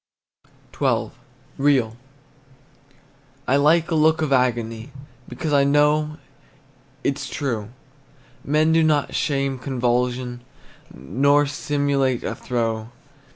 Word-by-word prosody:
XII. -, -, +1 dB, 0.5 s
REAL. 135 Hz, -6 st, +2 dB, 1.5 s
I 130 Hz, -, +3 dB
like 155 Hz, +4 st, +3 dB
a -, -, +1 dB
look 160 Hz, 0 st, +3 dB
of 145 Hz, -3 st, 0 dB
agony, 120 Hz, -1 st, 0 dB, 0.4 s
Because 155 Hz, -3 st, -3 dB
I 140 Hz, -1 st, +5 dB
know 150 Hz, +2 st, +2 dB, 0.9 s
it 140 Hz, +1 st, 0 dB
's 140 Hz, -3 st, -6 dB
true; 115 Hz, -7 st, -3 dB, 0.7 s
Men 155 Hz, +2 st, +2 dB
do 165 Hz, 0 st, +4 dB
not 155 Hz, -2 st, +1 dB
sham 135 Hz, -2 st, -1 dB
convulsion, 125 Hz, -1 st, -1 dB, 0.5 s
Nor 140 Hz, -, +2 dB
simulate 140 Hz, -3 st, -1 dB
a -, -, -2 dB
throe. 115 Hz, -2 st, -3 dB
140 Hz, 105 wpm, -22 LUFS, 125-150 Hz, 1.5 s, I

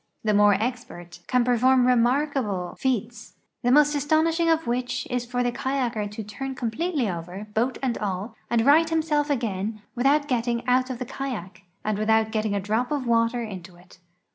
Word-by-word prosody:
The 215 Hz, -1 st, +2 dB
more 205 Hz, 0 st, +5 dB
expert 200 Hz, -7 st, -5 dB
can 250 Hz, -1 st, +2 dB
i)erfonn 250 Hz, +1 st, +4 dB
remarkable 250 Hz, -6 st, +1 dB
feats, 235 Hz, -3 st, -2 dB, 0.3 s
the 245 Hz, -, +2 dB
most 295 Hz, +2 st, +5 dB
astonishing 315 Hz, +3 st, +2 dB
of 325 Hz, -1 st, +3 dB
wdiich 245 Hz, -3 st, -2 dB
is 245 Hz, -1 st, -2 dB
for 245 Hz, 0 st, -1 dB
the 245 Hz, -, 0 dB
kayaker 240 Hz, -5 st, -2 dB
to 210 Hz, +2 st, -7 dB
turn 265 Hz, +6 st, -6 dB
com 240 Hz, -3 st, -2 dB
pletely 265 Hz, -, -1 dB
over, 180 Hz, +5 st, -7 dB
boat 240 Hz, +4 st, 0 dB
and 250 Hz, -3 st, -1 dB
all, 200 Hz, +2 st, -3 dB, 0.2 s
and 235 Hz, -1 st, +2 dB
right 320 Hz, +3 st, +5 dB
himself 310 Hz, -2 st, 0 dB
again 215 Hz, -5 st, -2 dB
without 285 Hz, +4 st, +2 dB
get 245 Hz, -4 st, 0 dB
ting 235 Hz, 0 st, -2 dB
out 255 Hz, +1 st, +2 dB
of 255 Hz, -, -4 dB
the 250 Hz, -, -5 dB
kayak, 210 Hz, -9 st, -6 dB, 0.2 s
and 210 Hz, -1 st, -1 dB
without 220 Hz, 0 st, +2 dB
getting 215 Hz, -2 st, -1 dB
a -, -, +1 dB
drop 220 Hz, +6 st, -1 dB
of 285 Hz, -3 st, -1 dB
water 235 Hz, +1 st, +1 dB
into 185 Hz, -5 st, -8 dB
it. 180 Hz, +1 st, -19 dB
240 Hz, 185 wpm, -25 LUFS, 215-265 Hz, 0.3 s, more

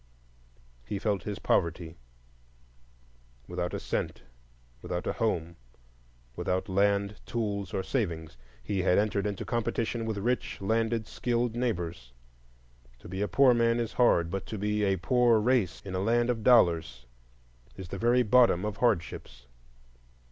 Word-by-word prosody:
He 80 Hz, +11 st, -4 dB
felt 100 Hz, -1 st, -1 dB
his 105 Hz, -1 st, -4 dB
poverty; 85 Hz, -1 st, 0 dB, 1.5 s
without -, -, -3 dB
a -, -, -3 dB
cent, -, -, -3 dB, 0.6 s
without 90 Hz, 0 st, -4 dB
a -, -, -1 dB
home, 85 Hz, -7 st, -2 dB, 0.8 s
without 95 Hz, +3 st, -2 dB
land, 100 Hz, +1 st, +1 dB
tools, 100 Hz, -5 st, -3 dB
or 95 Hz, -, -2 dB
savings, 85 Hz, -, -3 dB, 0.3 s
he 100 Hz, -2 st, -1 dB
had 90 Hz, 0 st, +3 dB
entered 105 Hz, -1 st, +1 dB
into 100 Hz, -2 st, -4 dB
competition 115 Hz, 0 st, -2 dB
with 110 Hz, -2 st, -2 dB
rich, 120 Hz, +5 st, -2 dB
landed, 110 Hz, +2 st, 0 dB
skilled 120 Hz, -1 st, -1 dB
neighbors. 85 Hz, -, -3 dB, 0.8 s
To -, -, -14 dB
be 95 Hz, +3 st, -5 dB
a 105 Hz, -, +1 dB
poor 135 Hz, +1 st, +5 dB
man 115 Hz, 0 st, +2 dB
is 115 Hz, -1 st, -3 dB
hard, 85 Hz, -9 st, +3 dB
but 95 Hz, -1 st, -4 dB
to 110 Hz, -, -5 dB
be 105 Hz, +1 st, -1 dB
a 95 Hz, -1 st, +2 dB
poor 120 Hz, +6 st, +3 dB
race 110 Hz, -5 st, +1 dB
in 95 Hz, -, -6 dB
a 95 Hz, -, -1 dB
land 120 Hz, +4 st, +2 dB
of 115 Hz, -2 st, -4 dB
dollars 85 Hz, -, +3 dB, 0.7 s
is 95 Hz, -3 st, -9 dB
the -, -, -5 dB
very 120 Hz, +2 st, +3 dB
bottom 115 Hz, -4 st, +4 dB
of 105 Hz, -1 st, -4 dB
hardships. 85 Hz, -, -1 dB
105 Hz, 145 wpm, -29 LUFS, 90-115 Hz, 1.5 s, poor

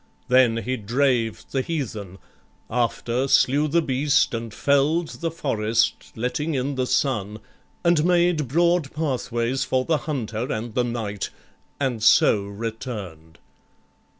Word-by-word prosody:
Then 125 Hz, -2 st, +5 dB
he 130 Hz, +1 st, -2 dB
drave 120 Hz, 0 st, 0 dB
The 135 Hz, -, 0 dB
heathen; 110 Hz, -, -4 dB, 0.5 s
after, 120 Hz, +2 st, 0 dB
slew 140 Hz, +3 st, +3 dB
the 165 Hz, +3 st, +2 dB
beast, 140 Hz, -1 st, +2 dB
and 115 Hz, -1 st, -4 dB
fell'd 145 Hz, +8 st, +1 dB
The 165 Hz, -, 0 dB
forest, 115 Hz, -8 st, -1 dB
letting 150 Hz, +7 st, -2 dB
in 135 Hz, +2 st, -1 dB
the 130 Hz, -1 st, -1 dB
sun, 105 Hz, -8 st, 0 dB, 0.5 s
and 170 Hz, -3 st, +3 dB
made 175 Hz, -4 st, +2 dB
Broad 170 Hz, +1 st, +2 dB
pathways 130 Hz, -4 st, -1 dB
for 130 Hz, -1 st, 0 dB
the 160 Hz, -2 st, +2 dB
hunter 120 Hz, -4 st, -3 dB
and 110 Hz, +1 st, -4 dB
the 125 Hz, -, +1 dB
knight, 110 Hz, -5 st, -3 dB, 0.5 s
And 130 Hz, -5 st, -1 dB
so 105 Hz, -1 st, +5 dB
return'd. 100 Hz, -, -7 dB
130 Hz, 125 wpm, -23 LUFS, 115-145 Hz, 0.5 s, Then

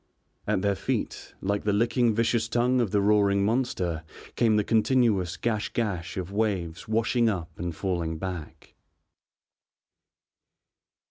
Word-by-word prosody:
At 95 Hz, -, +1 dB
their 100 Hz, 0 st, +2 dB
feet, -, -, -3 dB
like 100 Hz, +1 st, -1 dB
the 105 Hz, -, +1 dB
licking 115 Hz, +1 st, +2 dB
vicious 115 Hz, 0 st, +1 dB
tongue 125 Hz, +2 st, +2 dB
of 115 Hz, -, 0 dB
the 100 Hz, +1 st, +2 dB
roaring 100 Hz, -1 st, +3 dB
monster, 100 Hz, -9 st, -1 dB, 0.3 s
came 115 Hz, -3 st, +3 dB
the 105 Hz, -, +3 dB
continuous 110 Hz, -6 st, +2 dB
gash 110 Hz, -3 st, -1 dB
gash 100 Hz, -8 st, -2 dB
of 95 Hz, 0 st, -4 dB
waves 95 Hz, -6 st, -2 dB
washing 115 Hz, +2 st, +2 dB
up 90 Hz, -6 st, -3 dB
and 85 Hz, -1 st, -3 dB
falling 85 Hz, -4 st, -2 dB
back. 80 Hz, -3 st, -7 dB
105 Hz, 130 wpm, -27 LUFS, 90-115 Hz, 0.3 s, roaring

